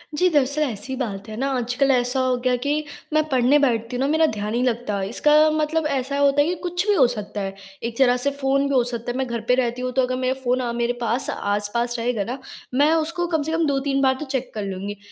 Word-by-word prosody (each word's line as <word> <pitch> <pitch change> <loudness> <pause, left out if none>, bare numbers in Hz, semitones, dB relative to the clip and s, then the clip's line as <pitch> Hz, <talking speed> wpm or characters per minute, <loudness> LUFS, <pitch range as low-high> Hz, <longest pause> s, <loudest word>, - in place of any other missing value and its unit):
जी, 365 +4 +3
दरअसल, 290 -1 +1
ऐसी 260 -2 -2
बात 205 -5 -4
है 215 - -6
ना, 270 - 0
आजकल 250 +3 +1
ऐसा 250 +1 +1
हो 255 -1 +2
गया 250 0 +1
कि 285 - +1 0.4
मैं 310 0 +4
पढ़ने 260 +1 +4
बैठती 235 -3 0
हूँ 245 - -2
ना, 270 - +2
मेरा 315 +2 +3
ध्यान 210 0 -3
नहीं 240 +2 0
लगता 230 -5 -1
इसका 270 +9 +1 0.2
मतलब 310 +1 0
ऐसा 275 0 -2
होता 285 0 +4
है 290 - +2
कि 355 - 0
कुछ 355 +1 -1
भी 415 - +4
हो 270 -8 +6
सकता 210 -2 -5
है। 195 0 -3 0.3
एक 230 0 -4
तरह 250 -2 +5
से 280 - +2
फ़ोन 275 +1 +2
भी 280 - -1
हो 255 -2 +4
सकता 235 0 -4
है 245 - -5
मैं 265 - 0
घर 235 -1 -3
पे 250 - +4
रहती 250 -1 -1
हूँ 255 - -2
तो 265 - +3
अगर 255 0 0
मेरा 255 0 0
फ़ोन 255 0 +1
अ, 240 -2 -2
मेरे 235 +1 0
पास 240 +2 -1
आस-पास 210 +4 -1
रहेगा 230 -3 0
ना 245 +6 -4 0.4
मैं 290 +4 +4
उसको 330 +2 0
कम 320 -3 0
से 320 - -3
कम 325 0 +1
2-3 275 -1 0
बार 265 -1 +4
तो 305 - -4
चेक 265 -2 -3
कर 215 - -4
लूँगी। 195 +2 -5
255 Hz, 260 wpm, -22 LUFS, 235-280 Hz, 0.4 s, हो